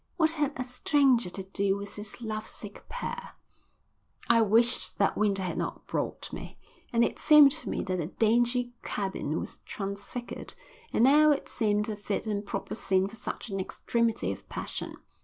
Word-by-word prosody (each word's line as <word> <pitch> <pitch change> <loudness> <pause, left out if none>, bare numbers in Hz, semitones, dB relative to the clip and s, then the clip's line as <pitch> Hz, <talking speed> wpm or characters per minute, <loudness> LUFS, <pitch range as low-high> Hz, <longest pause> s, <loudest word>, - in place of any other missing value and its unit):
What 320 -2 +4
had 300 -3 0
a 255 - -1
stranger 250 - +2
to 190 +2 -6
do 195 +1 0
with 200 0 -5
this 210 +3 -7
love 215 -1 -4
sick 205 -1 -7
pair? 485 0 -5 0.9
I 230 -1 +6
wished 230 +3 +3
that 200 - +2
Winter 200 -2 +1
had 180 - -2
not - - -4
brought - - -3
me. - - -7 0.3
And 235 0 +4
it - - -4
seemed 300 -2 +8
to 315 +2 -1
me - - -1
that 185 -1 -1
the 165 -3 -2
dingy 240 +4 +2
cabin 190 -6 -2
was - - -6
transfigured 200 +4 -6 0.4
and - - +3
now 300 +4 +7
it 290 - +1
seemed 210 -2 +1
a 215 - -2
fit 205 +1 -3
and 205 -2 -1
proper 200 - -4
scene 190 -3 +1
for 210 - -10
such 225 - -6
an 195 - -2
extremity 230 +4 0
of - - -9
passion. - - -5
220 Hz, 175 wpm, -29 LUFS, 200-250 Hz, 0.9 s, seemed